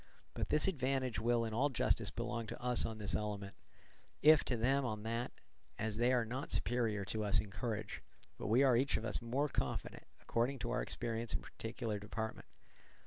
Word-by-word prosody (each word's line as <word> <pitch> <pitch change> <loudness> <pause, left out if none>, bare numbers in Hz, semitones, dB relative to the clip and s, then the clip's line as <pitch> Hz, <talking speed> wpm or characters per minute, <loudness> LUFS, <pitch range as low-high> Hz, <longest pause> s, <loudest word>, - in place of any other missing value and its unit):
But - - -2
this 150 - +5
advantage 130 - 0
will 115 +1 +2
in 110 - -4
all 135 +6 +3
justice 130 - +1
belong 115 -2 -3
to - - -6
us 125 -1 +2
on 110 -1 -5
this 105 -2 -3
element, 100 -2 -2 0.7
if 155 0 +8
to 125 - 0
them 135 +5 +2
on 110 -4 -3
that; 115 +2 -2 0.5
as 110 -1 -2
they 120 +2 +3
are 125 -2 +3
not 125 +5 -4
superior 115 -5 0
to 110 +2 -2
us 100 -2 +4
in 105 - -4
courage, 105 0 -3 0.4
but - - -3
we 120 +6 +5
are 130 -3 +5
each 130 +3 +2
of 110 - -4
us 110 - -1
more 130 +5 0
confident, - - -3
according 120 +4 0
to 120 -1 -3
our - - +1
experience 115 -1 -2
in - - +1
our - - -15
particular 110 -2 -3
department. 110 +2 -5
115 Hz, 200 wpm, -36 LUFS, 110-125 Hz, 0.7 s, if